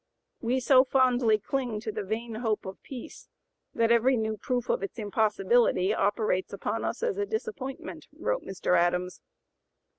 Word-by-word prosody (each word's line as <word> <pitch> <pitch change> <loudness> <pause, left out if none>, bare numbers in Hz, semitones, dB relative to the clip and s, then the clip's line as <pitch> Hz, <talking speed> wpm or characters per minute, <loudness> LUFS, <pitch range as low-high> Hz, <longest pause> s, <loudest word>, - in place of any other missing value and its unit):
"We 250 +2 +1
so 255 0 +6
fondly 250 -4 +3
cling 240 0 -2
to 215 - -4
the 215 0 -4
vain 220 +4 -4
hope 220 -1 -1
of 190 0 -8
peace, 255 -4 -10 0.5
that 230 0 +2
every 240 +2 +4
new 220 -1 -1
proof 245 +3 -2
of - - 0
its 195 - -5
impossibility 210 -2 +2
operates 205 -3 0
upon - - -3
us - - -3
as 445 -4 0
a 410 - +1
disappointment," 415 - -5
wrote - - -1
Mr. 185 -1 -1
Adams. 180 +1 +1
230 Hz, 155 wpm, -28 LUFS, 205-255 Hz, 0.5 s, so